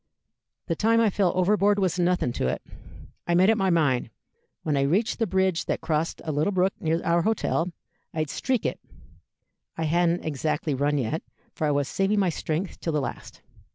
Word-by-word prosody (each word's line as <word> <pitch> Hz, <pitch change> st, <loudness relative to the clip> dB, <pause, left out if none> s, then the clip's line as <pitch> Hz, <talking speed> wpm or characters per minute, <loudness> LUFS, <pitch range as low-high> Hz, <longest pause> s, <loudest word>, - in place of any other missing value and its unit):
The 165 Hz, -, -1 dB
time 225 Hz, +5 st, +3 dB
I 225 Hz, -3 st, +3 dB
fell 190 Hz, -3 st, +2 dB
overboard 205 Hz, +2 st, +3 dB
was 185 Hz, -3 st, 0 dB
nothing 175 Hz, -7 st, +1 dB
to -, -, -1 dB
it. 65 Hz, 0 st, -2 dB, 0.6 s
I 170 Hz, -, +2 dB
made 185 Hz, +4 st, +5 dB
up 225 Hz, -, +1 dB
my 190 Hz, -1 st, +2 dB
mind, 145 Hz, -9 st, +2 dB, 0.5 s
when 150 Hz, -2 st, 0 dB
I 140 Hz, -, +2 dB
reached 190 Hz, -, +1 dB
the 225 Hz, -, +1 dB
bridge 190 Hz, -2 st, +1 dB
that -, -, -1 dB
crossed 160 Hz, +1 st, -2 dB
a 155 Hz, -, -1 dB
little 150 Hz, +6 st, +1 dB
brook 190 Hz, 0 st, +2 dB
near 165 Hz, +1 st, 0 dB
our 170 Hz, 0 st, +2 dB
hotel, 180 Hz, -4 st, 0 dB, 0.4 s
I'd 155 Hz, -2 st, -2 dB
streak 255 Hz, -4 st, -1 dB
it -, -, -1 dB, 1.0 s
(I 165 Hz, -, -1 dB
hadn't 170 Hz, +2 st, +1 dB
exactly 150 Hz, +1 st, -1 dB
run 145 Hz, +2 st, +1 dB
yet, 140 Hz, +5 st, -1 dB, 0.3 s
for 155 Hz, -, -1 dB
I -, -, +2 dB
was 140 Hz, -1 st, +1 dB
saving 195 Hz, +5 st, +1 dB
my 190 Hz, -3 st, +3 dB
strength 165 Hz, +3 st, -3 dB
till 165 Hz, -, -2 dB
the 150 Hz, -, +2 dB
last). 135 Hz, -, -6 dB
170 Hz, 190 wpm, -26 LUFS, 155-195 Hz, 1.0 s, made